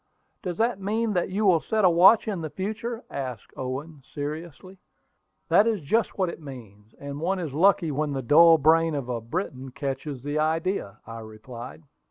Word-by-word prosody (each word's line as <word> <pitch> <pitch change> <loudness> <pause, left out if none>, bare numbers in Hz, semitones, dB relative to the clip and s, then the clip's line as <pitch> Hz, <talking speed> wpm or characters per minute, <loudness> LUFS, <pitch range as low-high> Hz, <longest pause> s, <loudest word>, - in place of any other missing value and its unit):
"Does 175 -2 -4
that 230 -3 0
mean 215 +3 -1
that 180 -1 0
you 205 +3 -1
will 180 -4 +5
set 215 +2 +1
a - - +7
watch 185 +7 +6
in 195 -5 -2
the 155 - -4
future?" 220 - -4
asked 130 -5 -6
Owen, 140 +4 -6
seriously. 160 +5 -6 0.7
"That 210 - +5
is 220 -3 +1
just 220 +11 0
what 185 -3 +1
it 170 - -8
means: 110 -7 -12
and 140 +1 -7
one 190 +4 0
is 165 -7 -4
lucky 170 0 +3
when 150 +1 -1
the 135 -1 -3
dull 165 +5 +7
brain 160 +1 +3
of 135 -3 -4
a 120 -2 -2
Briton 135 - -4
catches 135 0 -5
the 145 +1 -2
idea," 160 - -1
I 115 0 -8
replied. 115 +6 -10
160 Hz, 185 wpm, -25 LUFS, 135-190 Hz, 0.7 s, a